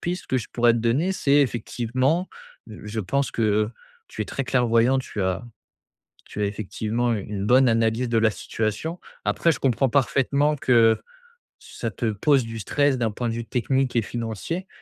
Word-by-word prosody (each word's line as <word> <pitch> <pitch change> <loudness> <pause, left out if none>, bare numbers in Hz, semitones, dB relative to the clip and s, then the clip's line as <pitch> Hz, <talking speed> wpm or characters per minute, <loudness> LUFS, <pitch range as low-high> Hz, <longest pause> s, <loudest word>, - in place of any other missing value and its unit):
piste 180 +1 -4
que 130 - 0
je 115 - -3
pourrais 120 -1 +4
te 115 - 0
donner, 140 +12 +1
c'est, 145 -6 +2
effectivement, 130 - 0 0.4
heu, 110 - -10
je 105 +1 -5
pense 140 +8 -1
que, 115 - -2
heu, 105 0 +2 0.4
tu - - -9
es - - 0
très 135 - -3
clairvoyant, 125 0 +2
tu 105 -6 -4
as 95 +5 -1 0.8
tu 105 - -8
as - - +2
effectivement 110 +3 -2
une 105 -3 -3
une 100 -1 -3
bonne 130 +1 +5
analyse 115 +2 +1
de 115 -1 +2
la 110 -1 +4
situation. 110 - -3 0.2
Après, 170 - +2
je - - 0
comprends 135 0 +2
parfaitement 140 +2 +2
que 115 -5 +4 0.6
ça 115 - -6
te 110 +2 -2
pose 135 +5 +2
du 115 0 -6
stress, 140 +5 +1
d'un 115 - +1
point 120 +3 -3
de 115 - -1
vue 115 0 -4
technique 130 +2 0
et 115 - +3
financier 120 - -4
120 Hz, 185 wpm, -24 LUFS, 110-135 Hz, 0.8 s, bonne